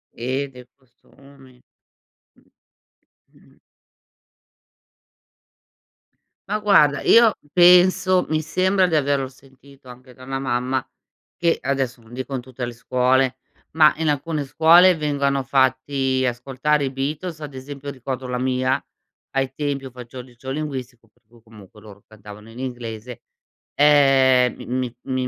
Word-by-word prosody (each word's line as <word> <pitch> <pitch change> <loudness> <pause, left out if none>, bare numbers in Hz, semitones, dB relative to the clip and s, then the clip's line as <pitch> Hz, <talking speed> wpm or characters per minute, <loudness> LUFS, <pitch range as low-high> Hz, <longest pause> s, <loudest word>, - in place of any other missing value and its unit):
Eh, 130 +4 -3
dei 125 -1 -14
costumi. 135 0 -21 0.8
Mh. - - -27 0.9
Mh-mh. - - -24 2.9
Ma 210 - -1
guarda, 155 -9 +4
io 230 -2 +5 0.2
penso, 180 +1 +5
mi 155 0 -1
sembra 185 +4 +1
di 170 -3 0
averlo 140 -2 0
sentito 135 0 -20
anche 125 +1 -14
da 130 - -16
una 135 0 -4
mamma 130 0 -2 0.5
che, 170 -1 +1
adesso 135 -3 -2
non 115 +1 -20
dico 130 +2 -5
in 130 - -3
tutte 125 0 -7
le 120 - -7
scuole, 130 +2 +1 0.3
ma 155 -1 +5
in 160 0 -1
alcune 150 +1 -2
scuole 170 +6 +5
vengano 140 -2 -1
fatti 130 0 0
ascoltare 135 +4 -1
i 135 - -2
Beatles, 150 +5 -4
ad 150 -2 -8
esempio 140 +2 -8
ricordo 130 -1 -6
la 125 0 -3
mia, 130 +1 0 0.5
ai 135 -1 -1
tempi 145 -2 -3
io 130 - -9
faccio 125 0 -11 0.3
linguistico 130 -5 -6
per 105 - -38
cui 115 +2 -23
comunque 105 -2 -17
loro 105 -1 -15
cantavano 105 0 -14
in 115 - -12
inglese, 120 -2 -7 0.5
ehm, 135 -4 +4
mi 125 -1 -3
mi 130 -1 -2
135 Hz, 130 wpm, -21 LUFS, 125-145 Hz, 2.9 s, io